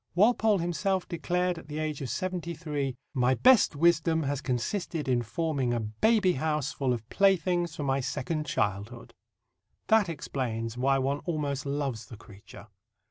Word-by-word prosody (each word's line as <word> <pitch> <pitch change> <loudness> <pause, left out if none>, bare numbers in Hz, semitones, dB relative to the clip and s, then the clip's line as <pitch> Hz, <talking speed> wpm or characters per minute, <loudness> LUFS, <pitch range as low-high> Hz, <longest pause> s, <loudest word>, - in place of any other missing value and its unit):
Walpole 215 +1 +4
himself 185 +2 -1
declared 180 0 -1
at - - -14
the 150 0 -6
age 155 -2 -3
of 135 - -4
seventy 170 +5 -3
three: 145 -5 -3 0.2
"My 130 0 +2
best 250 - +5
wisdom 165 0 +3
has 140 0 -2
consisted 150 - -2
in 125 -2 +2
forming 130 0 -1
a - - 0
baby 180 - +2
house 150 0 -1
full 135 -3 -1
of 115 -3 -3
playthings 180 -3 +2
for 150 - -4
my 135 -1 +1
second 150 +4 -3
childhood." 105 +5 -2 0.8
That 220 -4 +4
explains 115 -7 -3
why 135 +2 +2
one 135 +2 0
almost 145 -4 -2
loves 140 -5 -3
the 115 - -10
creature. 105 0 -14
150 Hz, 155 wpm, -28 LUFS, 130-175 Hz, 0.8 s, best